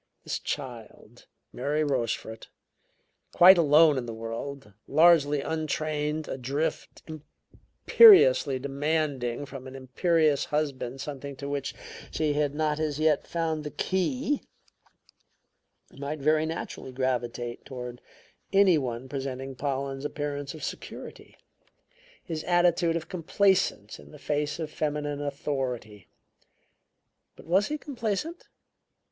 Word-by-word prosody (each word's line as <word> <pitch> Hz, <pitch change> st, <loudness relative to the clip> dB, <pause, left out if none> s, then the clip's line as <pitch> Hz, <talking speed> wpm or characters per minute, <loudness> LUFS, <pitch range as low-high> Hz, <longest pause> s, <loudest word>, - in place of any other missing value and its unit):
This -, -, -3 dB
child, 120 Hz, -4 st, -7 dB, 0.3 s
Mary 150 Hz, +4 st, -1 dB
Rochefort, 115 Hz, -5 st, -3 dB, 0.8 s
quite 180 Hz, +1 st, +8 dB
alone 150 Hz, -2 st, +5 dB
in 120 Hz, -, -6 dB
the 115 Hz, -, -5 dB
world, 115 Hz, +1 st, -6 dB
largely 155 Hz, -3 st, +5 dB
untrained, 155 Hz, 0 st, -2 dB
adrift, 135 Hz, +5 st, -3 dB
imperiously 390 Hz, -, +4 dB
demanding 140 Hz, -2 st, -2 dB
from 135 Hz, -2 st, -9 dB
an 130 Hz, -, -10 dB
imperious 150 Hz, +3 st, +1 dB
husband 135 Hz, -4 st, -2 dB
something 140 Hz, -1 st, -6 dB
to 140 Hz, +1 st, -7 dB
which 140 Hz, -1 st, -3 dB, 0.3 s
she 155 Hz, -2 st, 0 dB
had 145 Hz, -1 st, 0 dB
not 155 Hz, 0 st, 0 dB
as 155 Hz, -2 st, -2 dB
yet 155 Hz, -2 st, +2 dB
found 160 Hz, -2 st, -2 dB
the 150 Hz, -, -4 dB
key, 255 Hz, -, -1 dB, 1.5 s
might 140 Hz, +2 st, -5 dB
very 155 Hz, +2 st, +2 dB
naturally 160 Hz, -4 st, -6 dB
gravitate 120 Hz, -2 st, -3 dB
toward 125 Hz, -1 st, -8 dB, 0.5 s
any 195 Hz, -5 st, +5 dB
one 125 Hz, -1 st, -4 dB
presenting 135 Hz, -1 st, -5 dB
Pollen's 135 Hz, 0 st, -3 dB
appearance 145 Hz, -1 st, -4 dB
of 155 Hz, -, -10 dB
security; -, -, -8 dB, 0.9 s
his 160 Hz, -3 st, -5 dB
attitude 175 Hz, -1 st, +3 dB
of 165 Hz, -1 st, -3 dB
complacence 180 Hz, -, 0 dB
in -, -, -14 dB
the 150 Hz, -, -12 dB
face 150 Hz, 0 st, -2 dB
of 160 Hz, -2 st, -5 dB
feminine 145 Hz, -1 st, -2 dB
authority. 130 Hz, -8 st, -4 dB, 1.3 s
But -, -, -15 dB
was 190 Hz, +4 st, +2 dB
he 300 Hz, -, -3 dB
complacent? 280 Hz, -, -4 dB
145 Hz, 115 wpm, -27 LUFS, 135-160 Hz, 1.5 s, quite